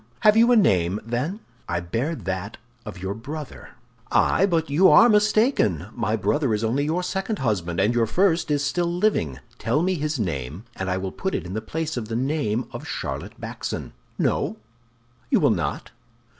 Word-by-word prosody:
Have 210 0 +6
you 230 +2 +5
a - - +6
name, 95 - +3
then?" 130 - -2 0.3
"I 85 0 0
bear 115 - -2
that 95 - -4 0.3
of 105 -3 -7
your 95 +1 -2
brother." 145 +7 -8 0.4
"Ay, 195 - +3
but 165 -4 +1
you 160 +7 +5
are 235 - +8
mistaken. 210 - +2
My 110 - 0
brother 130 +1 +1
is 105 - -3
only 130 +6 +1
your 165 +4 0
second 190 +4 -2
husband; 90 - -1
and 110 - +3
your 115 -1 +2
first 175 - +2
is 145 -1 +1
still 170 +4 0
living. 175 - 0 0.2
Tell 150 - +1
me 185 +1 +2
his 155 -4 -2
name, 80 - -3
and 95 - -3
I 90 - 0
will 95 0 -3
put 190 - -3
it - - -3
in 90 - -6
the 110 - -2
place 160 +5 -3
of 110 -3 -3
the 115 - -4
name 125 -3 0
of - - -7
Charlotte - - -5
Backson. - - -5 0.3
No? - - 0 0.7
You - - +4
will - - +4
not? - - -2
130 Hz, 185 wpm, -24 LUFS, -, 0.7 s, are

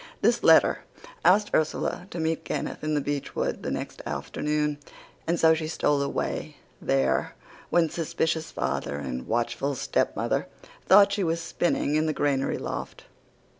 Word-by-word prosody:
This - - +3
letter - - +6 0.4
asked 205 +3 +4
Ursula 155 +3 0
to 175 - -6
meet 160 0 -1
Kenneth - - -4
in 155 0 0
the 145 - +1
beechwood 145 0 -2
the - - -3
next - - -5
afternoon, 150 -1 -2 0.5
and 170 +1 +1
so 160 0 +6
she 160 -1 -2
stole 145 -2 +1
away 140 - -3 0.2
there 65 0 +1 0.3
when 170 -1 +3
suspicious 160 0 -1
father 70 - -2
and 65 -3 -5
watchful 120 +4 -1
stepmother - - 0 0.4
thought 200 +1 +7
she 200 -1 0
was 165 -1 0
spinning 170 -3 0
in 155 +1 +2
the 155 - 0
granary 140 -2 0
loft." - - -6
155 Hz, 145 wpm, -26 LUFS, 140-165 Hz, 0.5 s, thought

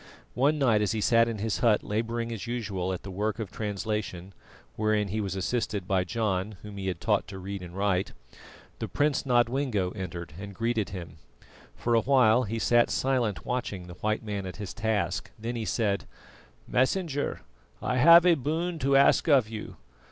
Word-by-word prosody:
One 140 +5 +2
night 120 -7 +3
as 105 +1 +1
he 110 - -1
sat 115 +2 +4
in 115 -2 -3
his 110 +1 -2
hut 115 -3 +3
labouring 115 +2 -2
as 115 0 -5
usual 100 -6 -2
at 90 - -5
the 100 - -7
work 105 +3 -2
of 110 -5 -5
translation, 105 -3 -4 0.4
wherein 110 -1 +1
he 110 +3 -1
was 95 -1 -3
assisted 100 -1 -2
by 95 -2 +1
John 105 -1 -1
whom 105 -1 -9
he 95 -1 -4
had 90 -3 -2
taught 105 -3 +1
to 100 -1 -8
read 95 +1 -6
and 90 +1 -9
write, 100 -2 +1 0.7
the - - -3
Prince 145 -1 0
Nodwengo 120 -5 +1
entered 85 -5 -6
and 100 0 -8
greeted 115 -1 -1
him. 85 -4 -8 0.6
For 120 - -1
a 115 - +5
while 125 -2 +4
he 110 +2 -3
sat 120 +1 +3
silent 120 - 0
watching 115 -7 -3
the 90 - -9
white 110 +5 -2
man 100 -3 -4
at 90 - -7
his 105 -3 -6
task, 100 -5 -1
then 115 +2 -4
he 115 -2 -3
said: 105 -4 0 0.6
"Messenger, 145 +3 0 0.4
I 125 - -1
have 170 +6 +8
a 180 - +7
boon 160 +4 -2
to 135 0 +2
ask 140 +4 +4
of 135 -8 +4
you. 110 -1 -7
110 Hz, 185 wpm, -28 LUFS, 100-120 Hz, 0.7 s, have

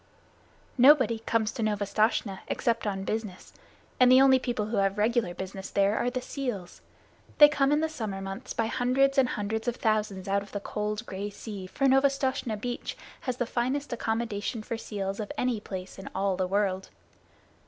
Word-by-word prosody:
Nobody 260 -3 +6
comes 225 -1 0
to 230 - -5
Novastoshnah 210 -1 0
except 230 -2 0
on 195 -1 -2
business, 215 -3 -4 0.5
and 250 0 +7
the 255 - +8
only 265 -1 +6
people 240 -4 -2
who 215 +1 -2
have 195 0 +1
regular 220 -4 +1
business 190 0 -6
there 200 +1 +2
are 245 - +1
the 255 0 -4
seals. 245 -10 -5 0.6
They 295 - +10
come 285 -2 +1
in 295 +1 +3
the 320 - +1
summer 220 -10 -5
months 195 0 -6
by 225 - 0
hundreds 265 +4 +2
and 255 -1 +3
hundreds 220 +3 -3
of 240 - 0
thousands 210 -5 -1
out 200 +1 +1
of 200 -1 -12
the 205 - -2
cold 210 +2 -3
gray 200 0 -4
sea. 200 -2 -8
For 275 - -1
Novastoshnah 270 -4 +2
Beach 240 +3 -4 0.2
has 255 -2 -3
the 245 - 0
finest 255 +4 -1
accommodation 225 -1 -2
for 230 - -4
seals 200 -3 -4
of 210 - -4
any 250 -4 0
place 190 -2 -7
in 195 - -7
all 195 0 +1
the 185 0 -1
world. 190 -1 0
220 Hz, 180 wpm, -28 LUFS, 200-250 Hz, 0.6 s, They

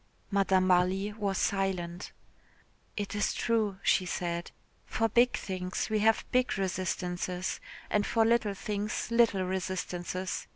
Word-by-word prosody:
Madame 195 -2 +3
Marly 185 +3 +2
was 200 -3 -1
silent. 185 -2 -1 0.9
"It 205 -1 -3
is 205 0 0
true," 220 -4 +1
she 185 - +3
said, 170 -1 -2 0.4
"for 225 - +1
big 240 +3 +3
things 185 +2 -3
we 215 - +2
have 220 +1 +3
big 255 -3 +2
resistances, 185 -1 -2 0.3
and 210 - +2
for 225 +2 +2
little 225 -3 +2
things 210 +3 -3
little 230 -5 +4
resistances. 185 0 -3
195 Hz, 125 wpm, -30 LUFS, 185-210 Hz, 0.9 s, little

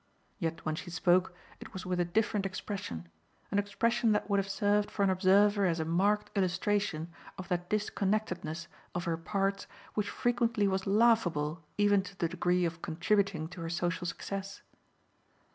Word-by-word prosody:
Yet 165 -3 -3
when 155 - 0
she 170 +3 -6
spoke 180 +1 +2 0.2
it - - -11
was 185 -1 -6
with 180 -1 -1
a 175 - +3
different 210 +3 +1
expression, 185 - -5 0.4
an 200 - +2
expression 230 +3 +1
that 210 - 0
would 200 - +4
have 195 0 -2
served 205 +1 +2
for 200 - -1
an 195 - +4
observer 200 +2 +4
as 170 -1 0
a 160 - -1
marked 200 +7 +1
illustration 185 -3 0 0.3
of 185 0 -7
that 175 -1 -1
disconnectedness 195 -6 -1 0.3
of 175 - -1
her 170 -2 0
parts 195 +3 -1 0.3
which 210 -1 -1
frequently 235 -4 +1
was 190 0 -1
laughable 190 -8 +3 0.2
even 205 -1 +4
to 195 0 -11
the 170 - +1
degree 180 0 +1
of 165 0 -3
contributing 175 0 0
to 175 - -9
her 165 - -3
social 175 +1 -1
success. 195 +2 -5
190 Hz, 165 wpm, -31 LUFS, 175-205 Hz, 0.4 s, would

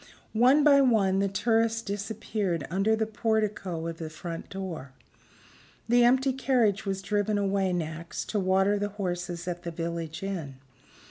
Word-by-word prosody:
One 255 +6 +5
by 280 -1 +6
one 205 -7 +3
the 200 - +2
tourists 225 +3 +1
disappeared 200 -5 -3
under 195 +4 +2
the 220 0 0
portico 215 -6 -1
of 165 0 -5
the 160 -1 -5
front 165 +1 -7
door. 175 -8 -6 0.9
The 240 +1 +5
empty 260 +2 +4
carriage 240 -6 +1
was 195 0 -2
driven 205 +1 0
away 195 -1 +1
next, 165 -1 -4
to 210 - 0
water 195 +2 +2
the 205 0 -1
horses 175 -3 -4
at 175 -1 -3
the 175 - -5
village 165 0 -4
inn. 170 -9 -4
195 Hz, 150 wpm, -28 LUFS, 175-220 Hz, 0.9 s, by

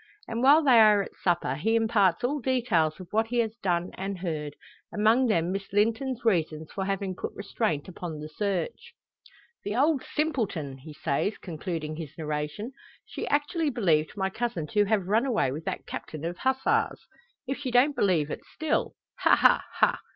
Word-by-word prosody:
And 230 +1 -3
while 290 +5 +6
they 255 -5 +6
are 210 -2 +6
at - - -10
supper, 175 -7 0
he 220 +12 0
imparts 215 -6 +2
all 285 +4 0
details 230 - +1
of 185 - -10
what 220 +1 +2
he 240 +2 -2
has 225 -2 0
done 175 -4 -1
and 195 0 -4
heard; 155 -5 -4 0.4
among 225 +5 +3
them 170 -5 +1
Miss 195 0 -4
Linton's 230 +5 0
reasons 160 -6 0
for 190 - -3
having 195 -1 -2
put - - -6
restraint 200 -6 -2
upon 175 -3 -6
the 150 - -6
search. 200 - -3 0.7
"The 205 +1 -3
old 285 +2 +2
simpleton!" 200 - -1
he 155 +4 -11
says, 150 +8 -1
concluding 160 -3 -5
his 155 -2 -8
narration, 150 - -4 0.3
"she - - -6
actually 295 +2 +1
believed 170 - +1
my 190 -1 0
cousin 225 -8 -2
to 210 -1 +3
have 205 -2 +1
run 225 +6 +2
away 220 - +1
with 155 +4 -6
that - - -4
captain 155 0 -6
of 175 +1 -4
Hussars 265 0 0 0.4
if 270 +1 -3
she 280 -3 -3
don't 250 +4 +4
believe 165 -7 +2
it - - -5
still! 315 -1 -1 0.2
Ha, - - +5
ha, - - +4
ha. - - +2
200 Hz, 180 wpm, -27 LUFS, 165-240 Hz, 0.7 s, while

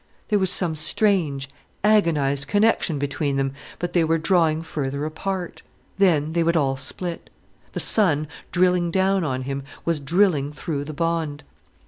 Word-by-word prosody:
There 210 -2 +3
was 190 -1 +1
some 175 -4 +2
strange, 155 -4 +1 0.4
agonized 150 -10 +2
connection 205 -4 +2
between 140 0 -2
them, 135 0 -1 0.2
but 175 0 -4
they 175 - +3
were 165 +1 +2
drawing 160 -1 +2
further 140 -3 -3
apart. 180 +3 -4 0.4
Then 160 -5 +3
they 170 - +2
would 170 0 +2
all 135 -3 +1
split. 165 +6 -4 0.4
The - - -3
sun, 155 -8 +2 0.2
drilling 180 -1 +2
down 190 +1 +2
on 130 -4 -2
him, 135 +1 -3 0.2
was 165 -2 0
drilling 150 -1 +1
through 145 -1 -4
the 155 - -6
bond. 160 -2 -2
160 Hz, 150 wpm, -23 LUFS, 145-180 Hz, 0.4 s, There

